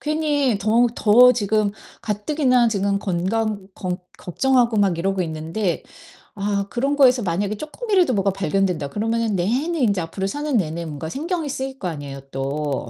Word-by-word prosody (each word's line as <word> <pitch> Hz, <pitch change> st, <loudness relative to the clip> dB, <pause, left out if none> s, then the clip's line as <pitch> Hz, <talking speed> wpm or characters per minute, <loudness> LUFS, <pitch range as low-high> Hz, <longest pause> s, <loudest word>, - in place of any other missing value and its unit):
괜히 295 Hz, -6 st, 0 dB
더 225 Hz, +4 st, +3 dB
더 245 Hz, +4 st, +6 dB
지금 215 Hz, -2 st, 0 dB, 0.3 s
가뜩이나 250 Hz, +3 st, +2 dB
지금 200 Hz, -2 st, 0 dB
건강 200 Hz, +2 st, -1 dB
겅 180 Hz, -1 st, -3 dB, 0.2 s
걱정하고 240 Hz, +4 st, +1 dB
막 195 Hz, -5 st, +2 dB
이러고 190 Hz, +2 st, 0 dB
있는데 165 Hz, +4 st, -3 dB, 0.5 s
아 200 Hz, -1 st, -1 dB
'그런 275 Hz, +4 st, 0 dB
거에서 255 Hz, -3 st, +5 dB
만약에 200 Hz, +3 st, -1 dB
쪼끔이라도 365 Hz, -, 0 dB
뭐가 195 Hz, -1 st, +2 dB
발견된다.' 185 Hz, -4 st, -1 dB
그러면은 225 Hz, +1 st, -1 dB
내내 260 Hz, -, 0 dB
인제 205 Hz, -7 st, +2 dB
앞으로 190 Hz, +4 st, -4 dB
사는 290 Hz, +8 st, -3 dB
내내 170 Hz, -2 st, -2 dB
뭔가 155 Hz, 0 st, -6 dB
신경이 320 Hz, -, -3 dB
쓰일 265 Hz, 0 st, -4 dB
거 185 Hz, -, -3 dB
아니에요 145 Hz, -4 st, -6 dB
또. 140 Hz, 0 st, -3 dB
205 Hz, 345 characters per minute, -22 LUFS, 180-255 Hz, 0.5 s, 더